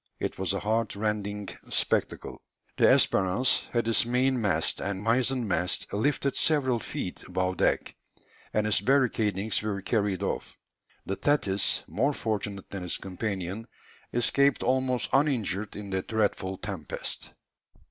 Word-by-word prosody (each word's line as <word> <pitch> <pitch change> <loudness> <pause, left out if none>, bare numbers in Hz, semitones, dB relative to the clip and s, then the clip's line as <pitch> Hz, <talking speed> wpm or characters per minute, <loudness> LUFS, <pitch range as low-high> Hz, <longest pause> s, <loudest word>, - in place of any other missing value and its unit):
It - - -3
was 95 0 0
a 100 - -1
heart 110 +1 0
rending 105 -1 -2 0.2
spectacle! - - -1 0.3
The - - +4
Espérance 100 +7 +4
had 120 -2 0
its 115 - +3
main 125 +1 +1
mast 80 -7 +1
and 95 0 -3
mizen 125 +1 +2
mast 90 -1 -1
lifted 140 +5 +1
several 130 -6 +2
feet - - -5
above 95 -1 -1
deck, - - +1 0.6
and 105 0 +1
its 105 -2 +2
barricadings 110 -5 +1
were 100 -2 -3
carried 100 -3 0
off; - - -3 0.5
the 95 - -2
Thetis, 100 -10 +2
more 140 +7 +1
fortunate 105 -3 -3
than 95 -2 -5
its 90 - -2
companion, 95 +2 -4 0.4
escaped 140 +4 +3
almost 130 -1 +1
uninjured 115 -8 +1
in 100 -1 -7
the 95 0 0
dreadful 100 -3 -1
tempest. 90 -6 -5
105 Hz, 135 wpm, -28 LUFS, 95-125 Hz, 0.6 s, The